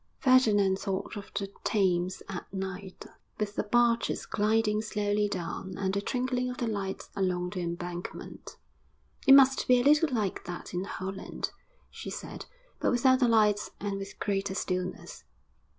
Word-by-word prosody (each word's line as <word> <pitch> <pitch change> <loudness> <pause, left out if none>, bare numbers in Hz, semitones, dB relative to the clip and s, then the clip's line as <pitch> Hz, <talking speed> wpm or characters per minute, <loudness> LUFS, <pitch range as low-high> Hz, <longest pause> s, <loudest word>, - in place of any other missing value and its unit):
Ferdinand 210 -8 +4
thought 195 0 -3
of 205 -1 -8
the 195 -1 -3
Thames 185 -3 +1
at 185 -2 -7
night, 190 0 -6 0.3
with 210 -1 -1
the - - +1
barges 235 +2 +2
gliding 215 0 +1
slowly 210 -1 0
down, 190 0 -4
and 190 -1 -1
the 200 - 0
twinkling 250 +2 -1
of 250 - -5
the 240 - -1
lights 200 -4 -4
along 180 -2 0
the 185 - -4
Embankment. 175 0 -6 0.7
'It 270 - +10
must 270 -1 +5
be 250 -1 +6
a - - +1
little 300 +3 +5
like 215 -6 -1
that 175 0 -7
in 180 +2 -2
Holland,' 190 0 -5 0.4
she - - -7
said, - - -7 0.3
'but - - +2
without 260 +1 +4
the 250 - +4
lights 210 -2 +3
and 200 -1 -3
with 195 0 -8
greater 195 -1 -1
stillness.' 185 -1 -3
200 Hz, 155 wpm, -29 LUFS, 190-230 Hz, 0.7 s, It